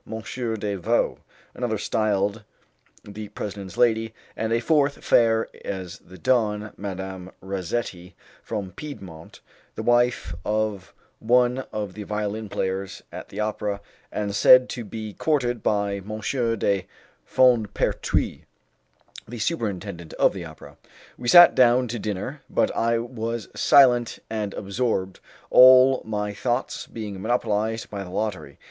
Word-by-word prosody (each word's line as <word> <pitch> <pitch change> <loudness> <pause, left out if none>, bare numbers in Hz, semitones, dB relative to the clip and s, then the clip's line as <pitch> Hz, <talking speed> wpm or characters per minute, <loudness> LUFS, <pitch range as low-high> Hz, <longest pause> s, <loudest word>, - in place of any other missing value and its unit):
de 105 -1 -2
Vaux, 115 +6 0 0.3
another 120 -3 -2
styled 105 0 0 0.6
the 105 +1 -8
President's 100 -2 -7
lady, 115 -2 +2 0.2
and 110 +1 -2
a 115 - +2
fourth, 145 +2 +1
fair 115 -1 +4 0.2
as 95 -3 -6
the 95 +1 -15
dawn, 105 0 0
Madame 95 -2 -6
Razzetti, 95 -1 -4 0.3
from 100 -4 -5
Piedmont, 90 - -10 0.3
the - - -5
wife 120 -8 +2
of 105 -3 -2 0.3
one 125 +2 +3
of 105 -3 -4
the 105 - -8
violin 105 +1 -3
players 95 +1 -3
at - - -9
the 100 - -8
opera, 105 -1 -2 0.3
and 105 -1 -3
said 125 +5 +7
to 120 - -5
be 110 0 -7
courted 125 -6 0
by 100 -1 0
M. 105 +2 -6 0.4
de 100 -2 0 0.4
Fondpertuis, 120 -5 +1 0.9
the 120 - -7
superintendent 100 - -3
of - - +3
the 90 -3 -6
opera. 75 -3 -12 0.4
We 120 - -7
sat 175 +7 +9
down 125 0 +4
to 120 0 -3
dinner, 105 +8 -4
but - - +1
I 115 0 +2
was 115 -1 -4
silent 120 -4 +5
and 105 -2 -3
absorbed, 100 -2 -2 0.3
all 130 +1 +8
my 105 -1 -3
thoughts 120 +4 -2
being 105 -4 -7
monopolized 110 -1 -1
by 100 -2 -4
the 90 - -10
lottery. 105 +1 -4
110 Hz, 130 wpm, -24 LUFS, 100-120 Hz, 0.9 s, sat